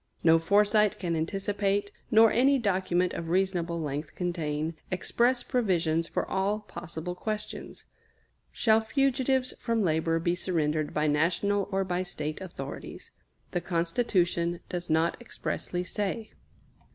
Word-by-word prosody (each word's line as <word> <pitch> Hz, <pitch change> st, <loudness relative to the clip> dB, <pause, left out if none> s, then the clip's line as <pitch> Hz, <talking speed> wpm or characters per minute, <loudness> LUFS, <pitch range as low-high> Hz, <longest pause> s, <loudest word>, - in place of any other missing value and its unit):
No 165 Hz, 0 st, +6 dB
foresight 205 Hz, +4 st, +3 dB
can 170 Hz, -3 st, -2 dB
anticipate, 200 Hz, +4 st, -1 dB, 0.2 s
nor 225 Hz, 0 st, +6 dB
any 270 Hz, +4 st, +4 dB
document 185 Hz, -5 st, +1 dB
of 165 Hz, -1 st, -5 dB
reasonable 175 Hz, -2 st, 0 dB
length 150 Hz, -1 st, -4 dB
contain, 160 Hz, -3 st, -2 dB, 0.2 s
express 240 Hz, +7 st, +1 dB
provisions 170 Hz, -8 st, +1 dB
for -, -, -2 dB
all 200 Hz, +2 st, 0 dB
possible 170 Hz, -3 st, -6 dB
questions. 210 Hz, +3 st, -5 dB, 0.7 s
Shall 220 Hz, -1 st, +3 dB
fugitives 265 Hz, +1 st, +1 dB
from 230 Hz, -3 st, +1 dB
labor 165 Hz, -1 st, +1 dB
be 170 Hz, +1 st, +1 dB
surrendered 155 Hz, -4 st, 0 dB
by 150 Hz, -, 0 dB
National 175 Hz, +7 st, +1 dB
or 195 Hz, 0 st, +1 dB
by 180 Hz, -1 st, -1 dB
State 155 Hz, -3 st, -4 dB
authorities? 140 Hz, -7 st, -8 dB, 0.4 s
The 175 Hz, -, -1 dB
Constitution 175 Hz, -1 st, 0 dB
does 175 Hz, -1 st, -4 dB
not 160 Hz, +7 st, +1 dB
expressly 180 Hz, -6 st, -3 dB
say. 205 Hz, +4 st, -3 dB
180 Hz, 125 wpm, -28 LUFS, 165-210 Hz, 0.7 s, No